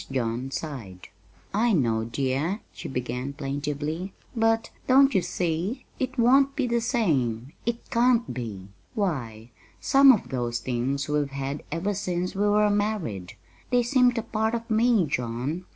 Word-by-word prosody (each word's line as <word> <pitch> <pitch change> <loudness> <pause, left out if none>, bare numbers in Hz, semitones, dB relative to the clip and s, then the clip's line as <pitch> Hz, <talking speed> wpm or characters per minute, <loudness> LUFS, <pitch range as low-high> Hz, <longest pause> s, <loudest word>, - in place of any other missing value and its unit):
John 125 0 -2
sighed. 120 - -6 0.4
"I 225 +3 +2
know, 115 - +1
dear," 135 - -1
she - - -7
began 125 +1 -3
plaintively; 150 +5 -3 0.2
"but, 225 0 +1 0.2
don't 270 +1 +6
you 190 - +3
see? 175 - -2
it 260 0 -2
won't 270 +3 +4
be 280 -4 0
the 235 -1 +1
same 145 - 0
it 235 0 -2
can't 240 - +3
be. 105 -6 -6 0.3
Why, 120 - -3 0.3
some 275 0 +7
of 225 - 0
those 120 -2 -1
things 130 +3 -2
we've 150 -1 0
had 140 +1 -4
ever 175 +6 -1
since 180 -2 -2
we 205 +2 +1
were 210 0 +4
married. 205 - -2 0.4
They 245 -1 +3
seemed 250 0 +3
a 230 - -1
part 220 0 -1
of 230 0 -5
me, 220 -3 +4
John. 130 +5 -3
165 Hz, 150 wpm, -26 LUFS, -, 0.4 s, some